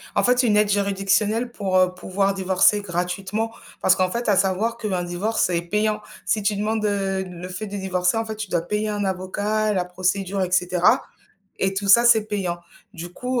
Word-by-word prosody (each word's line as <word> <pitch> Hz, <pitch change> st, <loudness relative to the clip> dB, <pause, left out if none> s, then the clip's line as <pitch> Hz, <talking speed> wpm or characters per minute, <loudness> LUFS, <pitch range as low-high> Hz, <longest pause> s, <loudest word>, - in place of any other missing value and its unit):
En -, -, +2 dB
fait, 250 Hz, +1 st, +3 dB
une 215 Hz, -4 st, +3 dB
aide 210 Hz, -1 st, +3 dB
juridictionnelle 200 Hz, +3 st, +1 dB
pour, 195 Hz, -5 st, -1 dB
heu, 185 Hz, 0 st, +3 dB
pouvoir 195 Hz, +2 st, -1 dB
divorcer 190 Hz, +2 st, +3 dB
gratuitement, 190 Hz, +4 st, -3 dB, 0.3 s
parce 190 Hz, 0 st, +4 dB
qu'en 185 Hz, -1 st, +1 dB
fait 235 Hz, +1 st, -2 dB
à 205 Hz, -, +4 dB
savoir 195 Hz, +5 st, +1 dB
qu'un 195 Hz, -6 st, -2 dB
divorce 180 Hz, +5 st, -1 dB
est 170 Hz, -1 st, 0 dB
payant. 210 Hz, +4 st, -1 dB, 0.2 s
Si 215 Hz, -, +1 dB
tu 205 Hz, 0 st, +1 dB
demandes 215 Hz, +1 st, -1 dB
heu, 195 Hz, -2 st, -1 dB
le 180 Hz, -1 st, -8 dB
fait 185 Hz, +4 st, -6 dB
de 205 Hz, 0 st, -5 dB
divorcer, 185 Hz, 0 st, 0 dB
en 225 Hz, -, -1 dB
fait 220 Hz, 0 st, -5 dB
tu 210 Hz, -2 st, -6 dB
dois 170 Hz, -, 0 dB
payer 210 Hz, +5 st, -2 dB
un 205 Hz, -1 st, -2 dB
avocat, 205 Hz, +3 st, -1 dB
la 180 Hz, -2 st, 0 dB
procédure 185 Hz, +2 st, -1 dB
et 180 Hz, -1 st, -1 dB
cetera 180 Hz, 0 st, +3 dB, 0.6 s
et 195 Hz, 0 st, +1 dB
tout 200 Hz, +1 st, -3 dB
ça 235 Hz, +4 st, +7 dB
c'est 225 Hz, -3 st, +5 dB
payant. 190 Hz, -5 st, -2 dB, 0.3 s
Du 175 Hz, -3 st, -7 dB
coup, 250 Hz, +4 st, -2 dB
195 Hz, 200 wpm, -22 LUFS, 185-215 Hz, 0.6 s, ça